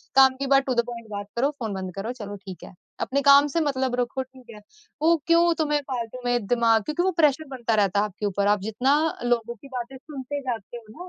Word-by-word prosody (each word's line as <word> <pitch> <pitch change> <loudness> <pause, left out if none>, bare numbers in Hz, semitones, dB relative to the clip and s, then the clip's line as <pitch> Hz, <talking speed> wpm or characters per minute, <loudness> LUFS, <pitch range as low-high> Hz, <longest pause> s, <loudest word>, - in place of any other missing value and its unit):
काम 265 -1 +7
की 275 +1 -3
बात 275 0 +5
टू 260 - 0
द 235 - +4
पॉइंट 235 -2 -7
बात 205 -1 -5
करो, 260 +4 +2
फ़ोन 220 -4 -3
बंद 190 -1 -5
करो 200 +4 -4
चलो 205 -1 -6
ठीक 190 -2 -10
है। - - -11 0.3
अपने 280 +2 0
काम 280 +1 +7
से - - +4
मतलब 265 -4 0
रखो 245 +2 -1
ठीक 260 -1 -18
है। 210 - -13 0.4
वो 330 +2 +5
क्यों 340 0 +5
तुम्हे 295 -1 +1
फालतू 240 -1 -4
में 245 -3 0
दिमाग 230 -2 +3
क्योंकि 305 - -1
वो 375 - +2
प्रेशर 300 +1 +3
बनता 235 -3 0
रहता 200 -1 +2
है, 210 - +2
आपके 210 0 -6
ऊपर 200 0 0
आप 205 0 +3
जितना 225 +7 +1 0.3
लोगों 235 -1 0
की 240 - -15
बातें 255 0 -6
सुनते 285 0 -6
जाते 240 -4 -5
हो 235 +10 -11
245 Hz, 235 wpm, -25 LUFS, 215-275 Hz, 0.4 s, काम